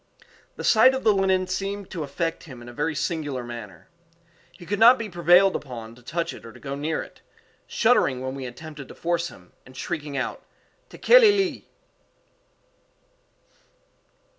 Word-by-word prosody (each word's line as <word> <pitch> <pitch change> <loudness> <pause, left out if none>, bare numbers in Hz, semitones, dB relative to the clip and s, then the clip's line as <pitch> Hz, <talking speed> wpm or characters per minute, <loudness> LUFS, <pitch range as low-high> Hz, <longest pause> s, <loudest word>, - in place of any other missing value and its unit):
The - - -7
sight 255 +4 +5
of 265 - -4
the 215 - +5
linen 190 -1 +1
seemed 195 +1 -4
to 170 - -5
affect 165 +4 -3
him 130 -6 -11
in 120 - -12
a 120 - -10
very 150 +4 -2
singular 145 -5 -3
manner. 115 -7 -9 0.6
He 175 - -14
could 205 +3 -2
not 235 +3 +8
be 225 -2 -5
prevailed 175 +2 +4
upon 115 -5 -7
to 125 - -18
touch 165 +6 -3
it - - -12
or 115 - -10
go 135 +3 -7
near 150 +3 -2
it, - - -17 0.5
shuddering 220 - +2
when 130 +1 -4
we 135 -1 -6
attempted 145 +2 -10
to - - -12
force 170 0 -1
him, 90 - -15
and 130 0 -16
shrieking 150 -4 -4
out, 130 - -3 0.5
_"Tekeli 455 -4 +5
li!" 390 -2 -2
160 Hz, 165 wpm, -24 LUFS, 130-195 Hz, 0.6 s, not